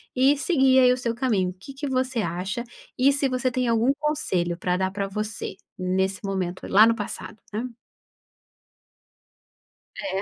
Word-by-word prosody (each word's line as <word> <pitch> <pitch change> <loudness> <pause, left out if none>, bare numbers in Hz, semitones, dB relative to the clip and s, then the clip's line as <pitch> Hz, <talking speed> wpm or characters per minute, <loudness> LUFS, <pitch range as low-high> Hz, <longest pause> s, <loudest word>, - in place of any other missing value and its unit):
e 265 +3 +5
seguir, 265 -5 +4
aí, 250 -1 +6
o 250 - -2
seu 235 -2 -2
caminho. 210 -7 0
Que 275 +8 -10
que 280 +1 -5
você 260 -2 0
acha, 185 +6 -3 0.3
e 270 +2 +5
se 275 0 +1
você 255 0 0
tem 255 0 0
algum 230 +2 +3
conselho 185 - 0
pra 180 0 0
dar 190 0 0
pra 200 0 -2
você, 210 0 -4 0.2
nesse 190 +1 -1
momento 185 -2 -3
lá 215 +3 +7
no 230 - +3
passado, 210 0 -6 0.2
né. 215 +3 -2 2.4
É. 195 -10 -2
230 Hz, 160 wpm, -25 LUFS, 190-260 Hz, 2.4 s, lá